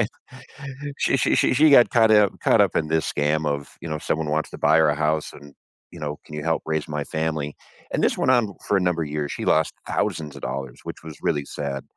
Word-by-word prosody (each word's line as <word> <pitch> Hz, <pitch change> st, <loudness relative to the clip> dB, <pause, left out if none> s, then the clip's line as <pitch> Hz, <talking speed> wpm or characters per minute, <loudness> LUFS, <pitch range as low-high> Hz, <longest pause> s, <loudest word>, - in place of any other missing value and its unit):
Alright? 105 Hz, -, +1 dB, 0.9 s
She -, -, +2 dB
she -, -, +2 dB
she -, -, +3 dB
she 155 Hz, +4 st, +5 dB
got 125 Hz, -4 st, +7 dB
caught 110 Hz, -2 st, +4 dB
up 105 Hz, -2 st, +4 dB
caught -, -, +4 dB
up -, -, +1 dB
in 75 Hz, -, +1 dB
this 80 Hz, -1 st, 0 dB
scam 75 Hz, +1 st, 0 dB
of, 70 Hz, -1 st, -3 dB
you 80 Hz, -, -6 dB
know, 75 Hz, -, -2 dB
someone 75 Hz, 0 st, -2 dB
wants 80 Hz, +1 st, -1 dB
to -, -, -8 dB
buy -, -, +4 dB
her 80 Hz, -2 st, +4 dB
a 75 Hz, -, +1 dB
house 75 Hz, 0 st, 0 dB
and, 70 Hz, -1 st, -14 dB, 0.4 s
you 85 Hz, -, -11 dB
know, 75 Hz, -1 st, -4 dB
can 75 Hz, -, -9 dB
you 75 Hz, -, -5 dB
help 80 Hz, 0 st, 0 dB
raise 80 Hz, -1 st, -2 dB
my 75 Hz, -1 st, -3 dB
family? 80 Hz, -2 st, -3 dB, 0.4 s
And -, -, -1 dB
this -, -, +2 dB
went 130 Hz, -, +2 dB
on 115 Hz, -6 st, +2 dB
for 100 Hz, -, +3 dB
a -, -, 0 dB
number 90 Hz, -2 st, 0 dB
years, 75 Hz, -1 st, -3 dB
she -, -, -5 dB
lost 80 Hz, 0 st, +2 dB
thousands 75 Hz, -3 st, -2 dB
of 70 Hz, -, -10 dB
dollars, 65 Hz, -2 st, -5 dB
which -, -, -8 dB
was 80 Hz, -2 st, -9 dB
really 70 Hz, -1 st, 0 dB
sad, 70 Hz, -2 st, -5 dB
80 Hz, 245 wpm, -23 LUFS, 75-85 Hz, 0.9 s, got